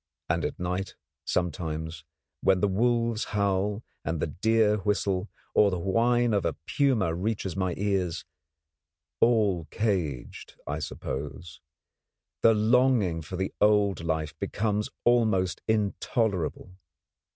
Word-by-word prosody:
And 85 0 +1
at - - -3
night 90 +2 -3 0.3
sometimes, 80 -2 -2 0.4
when 95 -1 +3
the 105 - +2
wolves 115 +2 +1
howl 100 +2 0 0.2
and 85 0 -2
the - - +1
deer 105 +6 +2
whistle, 100 -2 0 0.2
or 105 - +5
the 90 - -2
whine 115 +6 +2
of 100 - +2
a 85 - 0
puma 120 - +2
reaches 95 +1 -2
my 95 -2 -1
ears 95 -4 -1 0.9
all 105 -8 +3
caged, 85 - -3
I 75 +2 -3
suppose 70 +1 -6 0.8
the 115 -1 +6
longing 110 -6 +3
for 80 +4 -7
the 95 +1 -2
old 105 -5 +3
life 80 -2 -1
becomes 105 0 -1
almost 110 -7 +2
intolerable. 100 -4 -1
95 Hz, 120 wpm, -27 LUFS, 85-110 Hz, 0.9 s, the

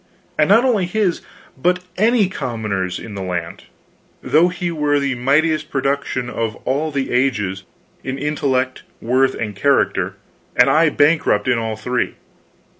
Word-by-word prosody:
And 150 - +2
not 225 +5 +5
only 215 -8 +2
his, 195 -2 0 0.3
but 180 +6 0
any 220 0 +3
commoner's 110 - -3
in 115 - -9
the 100 - -5
land, 90 -3 -4 0.6
though 160 +4 +4
he 180 -1 -3
were 150 -2 +1
the 140 -1 0
mightiest 155 +5 +1
production 135 -2 -1
of 115 -3 -3
all 145 +5 0
the 140 -3 -2
ages, 105 -7 0 0.4
in 130 +1 -4
intellect, 135 -3 -1 0.2
worth, 130 +3 +2
and 105 -3 -4
character, 140 +7 +1 0.4
and - - +5
I 160 +1 +4
bankrupt 145 -8 +2
in 125 -2 +2
all 110 -1 -3
three. 120 +3 -2
135 Hz, 145 wpm, -19 LUFS, 115-155 Hz, 0.6 s, not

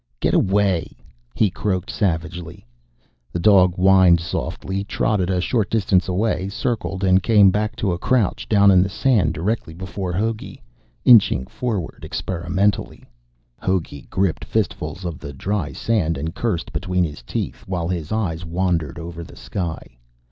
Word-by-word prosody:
"Get - - +1
away!" 95 -4 +1 0.4
he 105 -4 +2
croaked 95 -1 -2
savagely. 85 - -3 0.7
The 85 - -3
dog 90 -2 +5
whined 95 -2 +5
softly, 95 +3 -3
trotted 100 -2 0
a 90 -1 +1
short 105 +3 0
distance 95 -4 +2
away, 95 0 0
circled, 100 -3 -3
and 95 0 +4
came 105 -3 +5
back 105 +2 -1
to 95 -5 -1
crouch 115 -2 0
down 100 -2 +6
in 90 -1 +6
the 95 - 0
sand 100 - +1
directly 85 -2 -2
before 95 +1 -5
Hogey, 110 - -3 0.4
inching 110 - +6
forward 105 - -4
experimentally. 95 +3 -2 0.6
Hogey 85 -7 -2
gripped 95 -3 0
fistfuls 90 - -2
of 85 -4 -4
the 70 - -8
dry 90 +1 -2
sand 85 -5 0
and 80 +4 -4
cursed 95 -11 -2
between 90 +4 0
his 75 -5 -5
teeth, - - -4
while 90 -3 -2
his 85 -4 -3
eyes 90 -7 -1
wandered 85 -3 -1
over 85 0 -7
the - - -13
sky. 85 -10 -6
95 Hz, 145 wpm, -21 LUFS, 85-100 Hz, 0.7 s, down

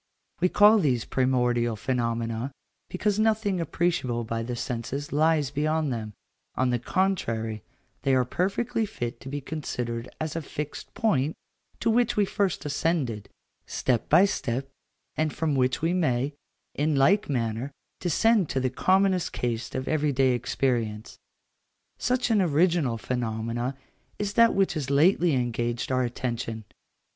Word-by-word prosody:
We 180 +1 +3
call 210 +3 +6
these 130 - +1
primordial 125 -3 +1
phenomena, 115 +1 -2 0.4
because 205 +2 0
nothing 215 -4 +1
appreciable 165 -9 0
by 115 0 -3
the 120 +1 -4
senses 125 +5 -4
lies 155 -2 +2
beyond 155 0 0
them, 110 -2 -5 0.4
on 130 -1 +1
the 120 - +1
contrary, 115 - -1 0.4
they 135 -1 +2
are 130 -1 +3
perfectly 205 - -1
fit 120 -8 -5
to 135 - -9
be 145 +1 -4
considered 125 -5 -4
as 155 -1 -3
a 165 - -1
fixed 150 0 -6
point 155 - +1 0.5
to 225 - +2
which 240 0 +2
we 205 - +4
first 195 -5 -1
ascended, 145 - -1 0.4
step 125 -3 -1
by 175 +6 +7
step, 135 -8 -2 0.5
and 155 -1 0
from 160 -2 -1
which 130 +1 +1
we 165 +2 +2
may, 145 -6 +1 0.4
in 150 +1 0
like 180 +10 +3
manner, 120 0 -1 0.3
descend 195 +2 +2
to 135 - 0
the 130 -1 0
commonest 185 +3 +2
case 120 -1 -3
of 130 +1 -3
every 150 -1 +1
day 130 -1 +3
experience. 120 -3 -1 0.8
Such 250 -1 +1
an 215 -3 +4
original 165 -6 +2
phenomenon 120 +1 -2 0.4
is 205 -1 -2
that 230 0 +5
which 195 -1 +2
has 145 -4 -3
lately 165 +2 +4
engaged 120 0 -1
our 130 0 +2
attention. 120 -2 -3
140 Hz, 145 wpm, -26 LUFS, 120-175 Hz, 0.8 s, by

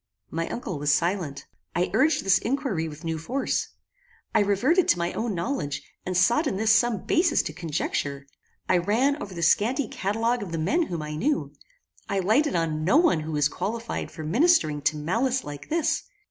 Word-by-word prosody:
My 165 +1 -2
uncle 195 -10 -4
was 145 0 +2
silent. 165 -2 -1 0.3
I 175 +1 0
urged 295 +1 +3
this 195 0 +4
inquiry 235 - -1
with 155 +1 -10
new 165 -1 -2
force. 255 - -1 0.7
I - - +4
reverted 240 - +3
to - - +4
my 170 0 -2
own 225 -3 -2
knowledge, 170 - -3 0.2
and 185 -1 0
sought 235 - +3
in 195 - -1
this 220 +2 +3
some 230 -3 +2
basis 335 -1 +3
to 155 - -5
conjecture. 145 -4 -3 0.4
I 180 - +3
ran 255 - +1
over 195 -2 -7
the 170 - -3
scanty 230 - +2
catalogue 225 +5 -1
of 195 -4 -6
the - - -1
men 305 - +1
whom 165 -3 -4
I 150 0 -5
knew; 280 - -1 0.6
I 200 - 0
lighted 220 +11 +2
on 160 -2 -1
no 190 - +4
one 320 - +4
who 155 +1 -5
was 150 -1 +3
qualified 230 +8 -4
for 160 - -8
ministering 165 - +3
to 155 - -8
malice 235 - 0
like 145 -1 -8
this. 325 -1 +1
195 Hz, 190 wpm, -26 LUFS, 160-250 Hz, 0.7 s, this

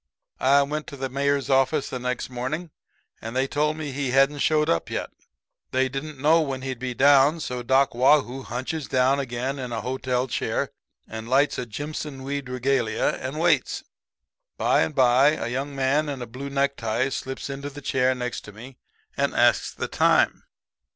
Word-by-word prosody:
"I 140 +2 +5
went 150 +2 -4
to 140 - -8
the 135 0 -3
Mayor's 140 0 0
office 135 +2 +2
the 130 - -3
next 125 0 -3
morning 150 +7 -4 0.5
and 115 +2 -6
they 130 +1 +2
told 150 +3 0
me 150 -3 -4
he 135 0 -2
hadn't 135 +3 +3
showed 155 +1 +2
up 85 - 0
yet. - - -4 0.6
They 130 0 +1
didn't 140 +3 -6
know 160 +4 +4
when 135 -4 -3
he'd 130 -2 -4
be 125 -1 -4
down. 145 +4 +5
So 125 -5 -4
Doc 130 +2 +2
Waugh 135 +4 +5
hoo 130 +3 -7
hunches 130 +5 -4
down 130 +2 +2
again 130 +1 -3
in 125 -2 -5
a 115 - -2
hotel 130 0 -1
chair - - -2 0.4
and 110 +1 -7
lights 140 +3 +3
a 125 - -4
jimpson 145 +2 -6
weed 140 -1 -4
regalia, 125 -3 0
and 135 +4 -4
waits. 165 -5 +1 0.7
"By - - +3
and 80 - -1
by 130 +3 +5
a 120 - -4
young 135 +3 -3
man 140 +3 +1
in 140 -2 -4
a 120 - -5
blue 130 +4 -7
necktie 135 -3 0
slips 135 0 -5
into 140 +1 -5
the 145 0 -10
chair 130 -2 +1
next 125 -1 -4
to 105 - -10
me 125 +5 -12 0.4
and - - 0
asks - - +3
the - - -4
time. - - +2
135 Hz, 185 wpm, -25 LUFS, 125-140 Hz, 0.7 s, I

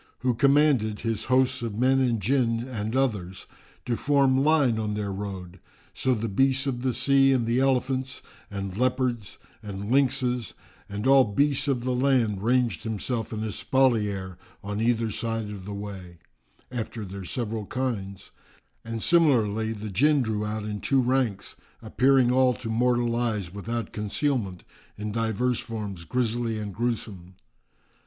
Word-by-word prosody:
who 130 -1 +2
commanded 135 -4 +3
his 115 -2 -2
hosts 130 0 +2
of 115 -3 -4
men 130 +2 +3
and 120 -4 +1
Jinn 120 0 +1
and 110 -2 -4
others[FN#362] 100 -9 -1 0.4
to 120 - 0
form 135 0 +3
line 145 -7 +3
on 105 -1 -2
their 105 -1 -3
road. 95 -2 -6 0.3
So 130 -1 +1
the 115 0 -2
beasts 135 +6 +2
of 125 -3 -2
the 130 0 +1
sea 135 +1 +4
and 125 -3 +2
the 120 +2 +1
elephants 130 0 0 0.3
and 100 -2 -5
leopards 125 -2 -1 0.2
and 100 0 -6
lynxes 130 -3 +1 0.3
and 105 +3 -4
all 135 -1 +6
beasts 140 +7 +1
of 130 -4 0
the 130 0 0
land 125 -6 +2
ranged 120 -4 +1
themselves 110 +1 -3
in 110 -1 -3
espalier 105 -6 0 0.2
on 105 +1 -3
either 115 -1 +1
side 115 -1 -3
of 100 -3 -8
the 100 - -6
way, 95 -4 -8 0.5
after 115 -3 -4
their 95 +1 -7
several 110 +1 -4
kinds, 100 -7 -4 0.5
and 115 -1 -4
similarly 115 -10 +3
the 105 -1 -6
Jinn 140 +7 +3
drew 110 -2 -2
out 105 0 -3
in 105 -1 -5
two 135 - +2
ranks, 120 -6 -1 0.2
appearing 125 +3 +3
all 130 -1 +3
to 115 - -7
mortal 120 0 +1
eyes 110 -7 -2
without 115 +2 -4
concealment, 105 - -1 0.3
in 105 0 -4
divers 115 +2 0
forms 105 -6 -6
grisly 115 +2 -1
and 105 -2 -5
gruesome. 100 -6 -4
115 Hz, 150 wpm, -26 LUFS, 105-130 Hz, 0.5 s, all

